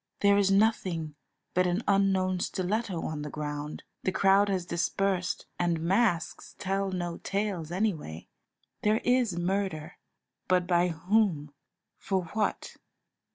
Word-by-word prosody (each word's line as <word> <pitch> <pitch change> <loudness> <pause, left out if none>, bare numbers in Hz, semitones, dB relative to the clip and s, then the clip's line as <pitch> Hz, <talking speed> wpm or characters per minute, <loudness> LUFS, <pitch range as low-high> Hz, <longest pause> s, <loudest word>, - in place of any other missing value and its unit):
There 200 0 +5
is 195 -1 +3
nothing 190 -6 +1 0.4
but 180 0 +3
an 180 +6 0
unknown 190 -2 +2
stiletto 190 0 -2
on 155 -1 -3
the 150 - -5
ground, 150 0 -5 0.2
the 190 - 0
crowd 195 +2 +4
has 185 -3 -1
dispersed, 185 +1 -1
and 170 -2 +1
masks 175 0 0
tell 195 0 -1
no 175 -2 -3
tales 195 -5 -2
anyway. 175 - -2 0.5
There 215 +1 +3
is 245 -7 +2
murder, 180 -3 -2 0.5
but 180 -1 +3
by 175 0 +3
whom? 170 -3 +1 0.5
for 190 -2 -1
what? 215 -1 -2
185 Hz, 125 wpm, -29 LUFS, 170-200 Hz, 0.5 s, There